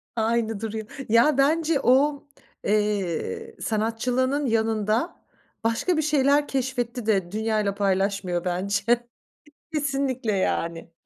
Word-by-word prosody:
Aynı 225 Hz, -1 st, 0 dB
duruyor. 220 Hz, -1 st, -4 dB, 0.2 s
Ya 240 Hz, +6 st, +4 dB
bence 310 Hz, +1 st, +2 dB
o, 280 Hz, +3 st, +3 dB, 0.4 s
eee, 210 Hz, -, -1 dB
sanatçılığının 250 Hz, +6 st, 0 dB
yanında, 225 Hz, -, 0 dB, 0.5 s
başka 230 Hz, +10 st, +1 dB
bir 315 Hz, -, +3 dB
şeyler 290 Hz, -1 st, +3 dB
keşfetti 245 Hz, -3 st, -2 dB
de 190 Hz, -5 st, +1 dB
dünyayla 215 Hz, -2 st, 0 dB
paylaşmıyor 195 Hz, -2 st, 0 dB
bence 195 Hz, +3 st, -1 dB, 0.9 s
kesinlikle 275 Hz, -5 st, -1 dB
yani. 170 Hz, -3 st, -2 dB
225 Hz, 100 wpm, -25 LUFS, 205-275 Hz, 0.9 s, Ya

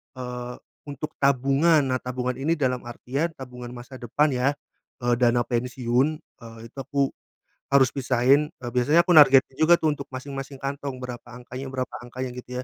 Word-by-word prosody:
Eee, 125 Hz, -1 st, -6 dB, 0.3 s
untuk 145 Hz, +1 st, -7 dB
tabungan, 140 Hz, +4 st, +3 dB
nah, 130 Hz, -, +1 dB
tabungan 125 Hz, 0 st, -3 dB
ini, 145 Hz, +5 st, +1 dB
dalam 125 Hz, -4 st, -1 dB
artian 135 Hz, +7 st, -3 dB
tabungan 125 Hz, -2 st, -9 dB
masa 125 Hz, +2 st, -10 dB
depan, 145 Hz, +6 st, +1 dB
ya, 125 Hz, 0 st, 0 dB, 0.6 s
eee, 120 Hz, 0 st, +3 dB
dana 120 Hz, -1 st, +3 dB
pensiun, 125 Hz, +1 st, 0 dB
eee, 115 Hz, -6 st, -14 dB
itu -, -, -34 dB
aku 140 Hz, 0 st, 0 dB, 0.6 s
harus 135 Hz, -2 st, +5 dB
pisahin. 135 Hz, +3 st, +2 dB
Eee, 120 Hz, -, -4 dB
biasanya 145 Hz, +7 st, +4 dB
aku -, -, +1 dB
nargetin 135 Hz, -3 st, +7 dB
juga, 160 Hz, +2 st, +6 dB
tuh, 155 Hz, -, +2 dB
untuk 140 Hz, -1 st, -8 dB
masing-masing 135 Hz, +1 st, -6 dB
kantong, 140 Hz, -1 st, -4 dB
berapa 125 Hz, -1 st, -6 dB
angkanya, 125 Hz, +2 st, -8 dB
berapa 130 Hz, -1 st, -4 dB
angkanya, 125 Hz, +1 st, -6 dB
gitu, 125 Hz, 0 st, -6 dB
130 Hz, 160 wpm, -25 LUFS, 125-140 Hz, 0.6 s, nargetin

